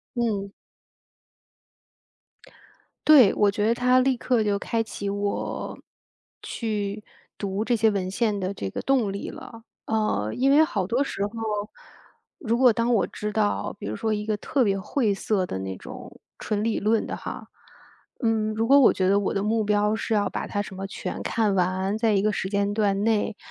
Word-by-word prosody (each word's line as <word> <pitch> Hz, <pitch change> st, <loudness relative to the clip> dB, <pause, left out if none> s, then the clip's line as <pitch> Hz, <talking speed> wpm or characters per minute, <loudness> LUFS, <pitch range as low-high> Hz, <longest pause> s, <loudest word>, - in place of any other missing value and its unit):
嗯。 210 Hz, -5 st, -1 dB, 2.5 s
对， 275 Hz, -10 st, +7 dB
我 205 Hz, -1 st, +3 dB
觉 205 Hz, +1 st, -1 dB
得 230 Hz, -, +3 dB
他 250 Hz, +1 st, +3 dB
立 260 Hz, 0 st, +2 dB
刻 240 Hz, -2 st, +1 dB
就 205 Hz, -1 st, +1 dB
开 230 Hz, +2 st, -1 dB
启 205 Hz, -2 st, -3 dB
我， 200 Hz, 0 st, -3 dB, 0.6 s
去 210 Hz, -2 st, -3 dB, 0.3 s
读 200 Hz, +1 st, -2 dB
这 240 Hz, -, +1 dB
些 225 Hz, -1 st, +3 dB
文 195 Hz, -3 st, -2 dB
献 210 Hz, +1 st, 0 dB
的 190 Hz, 0 st, -3 dB
这 100 Hz, -, -4 dB
个 -, -, -5 dB
动 250 Hz, -7 st, +1 dB
力 200 Hz, -, -5 dB
了。 230 Hz, -1 st, -10 dB, 0.2 s
呃， 210 Hz, -, 0 dB
因 270 Hz, +2 st, +2 dB
为 300 Hz, +2 st, +7 dB
好 205 Hz, -, 0 dB
多 235 Hz, +7 st, +1 dB
时 275 Hz, -, -5 dB
候， 205 Hz, -, -9 dB, 1.1 s
如 235 Hz, -8 st, 0 dB
果 250 Hz, -1 st, +6 dB
当 230 Hz, +2 st, +1 dB
我 210 Hz, -, +3 dB
知 210 Hz, 0 st, -5 dB
道， 205 Hz, -, 0 dB
比 -, -, -8 dB
如 105 Hz, +1 st, -3 dB
说 220 Hz, -, -1 dB
一 210 Hz, 0 st, -3 dB
个 215 Hz, 0 st, -1 dB
特 265 Hz, +6 st, 0 dB
别 200 Hz, -4 st, +1 dB
晦 210 Hz, +2 st, 0 dB
涩 195 Hz, 0 st, 0 dB
的 135 Hz, -, -4 dB
那 95 Hz, 0 st, -5 dB
种 -, -, -11 dB, 0.2 s
纯 210 Hz, -1 st, -2 dB
理 225 Hz, 0 st, 0 dB
论 215 Hz, +1 st, +1 dB
的 -, -, -5 dB
哈， -, -, -7 dB, 0.7 s
嗯， 220 Hz, -2 st, +1 dB
如 225 Hz, +1 st, -1 dB
果 280 Hz, +1 st, +7 dB
我 270 Hz, -, +6 dB
觉 185 Hz, -1 st, 0 dB
得 200 Hz, +1 st, +4 dB
我 200 Hz, -, -1 dB
的 195 Hz, -, 0 dB
目 220 Hz, +1 st, +1 dB
标 210 Hz, +1 st, +2 dB
是 220 Hz, -, -2 dB
要 205 Hz, -1 st, +1 dB
把 -, -, -4 dB
它 205 Hz, -, -2 dB
什 190 Hz, -2 st, -10 dB
么 195 Hz, +1 st, -4 dB
全 195 Hz, -, -6 dB
看 215 Hz, -4 st, +1 dB
完， 185 Hz, +3 st, 0 dB
在 220 Hz, -1 st, +2 dB
一 195 Hz, -1 st, +2 dB
个 215 Hz, +1 st, +2 dB
时 190 Hz, -, -2 dB
间 200 Hz, 0 st, 0 dB
段 205 Hz, -2 st, +1 dB
内， 215 Hz, -1 st, +1 dB
210 Hz, 205 characters per minute, -25 LUFS, 200-230 Hz, 2.5 s, 对